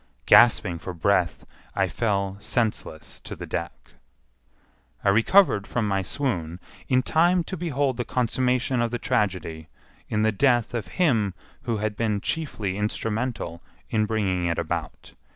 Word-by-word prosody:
Gasping 100 -7 +5
for 90 +1 -7
breath, 90 -2 +1 0.3
I 95 -1 +2
fell 100 0 -1
senseless 105 -8 -2
to - - -8
the - - -7
deck. - - -5 1.1
I - - +3
recovered 110 - +4
from 115 -3 -1
my 95 -1 +1
swoon 90 - -2 0.3
in 130 -1 +3
time 175 +4 +3
to 185 - -5
behold 145 -7 -1
the 120 - -1
consummation 125 +1 0
of 120 - +1
the 120 - -2
tragedy 90 -8 -1 0.4
in 105 0 +1
the 110 - +3
death 120 +1 +2
of 120 -3 -3
him 115 - +2 0.3
who 115 -3 0
had 105 0 -2
been 105 -2 0
chiefly 105 -8 -3
instrumental 105 -4 -2 0.3
in 110 -1 +1
bringing 95 -5 0
it 85 - -1
about. - - -4
110 Hz, 145 wpm, -25 LUFS, 95-125 Hz, 1.1 s, Gasping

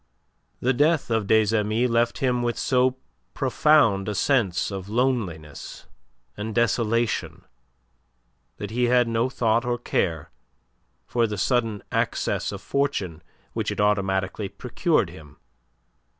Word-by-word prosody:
The 130 +2 +2
death 150 0 +2
of 110 -3 0
des 110 0 +3
Amis 110 +3 +1
left 120 0 +1
him 125 -2 +1
with 120 -1 -1
so 130 0 +2 0.4
profound 130 -7 +3
a 105 - -3
sense 105 -8 +1
of 95 0 -6
loneliness 105 - -2 0.5
and 110 +1 -5
desolation 115 0 0 1.1
that 105 0 -6
he 125 +2 +1
had 125 0 +3
no 115 +2 0
thought 115 -2 +1
or 120 0 -1
care 85 -8 -2 0.7
for 120 -1 +1
the 105 -1 -4
sudden 115 -1 0
access - - -1
of - - -8
fortune 100 - -1 0.3
which - - -2
it - - -4
automatically 95 -1 0
procured 120 - 0
him. 75 -4 -14
115 Hz, 125 wpm, -24 LUFS, 100-125 Hz, 1.1 s, des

